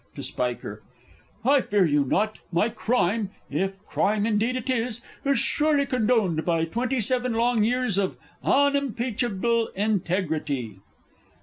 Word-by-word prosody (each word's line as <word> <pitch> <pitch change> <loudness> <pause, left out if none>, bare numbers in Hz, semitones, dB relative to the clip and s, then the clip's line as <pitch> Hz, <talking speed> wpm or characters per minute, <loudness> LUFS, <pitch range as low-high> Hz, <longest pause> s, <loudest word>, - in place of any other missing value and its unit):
(To - - -6
SPIKER.) 120 -4 -3 0.6
I 275 +1 +5
fear 205 -5 +2
you 145 -2 +2
not; 210 +10 0
my 185 +6 +2
crime 220 -2 0 0.2
if 190 +6 -1
crime 210 0 +1
indeed 225 +3 +1
it 255 - -4
was 245 -2 -1 0.2
is 275 0 +2
surely 295 -2 +2
condoned 220 - +1
by 165 -2 +1
twenty 245 +9 -1
seven 250 +2 +2
long 235 -1 +2
years 245 -3 +1
of 190 -2 -1 0.3
unimpeachable 240 -5 +1
integrity! 160 - -1
220 Hz, 125 wpm, -25 LUFS, 185-250 Hz, 0.6 s, I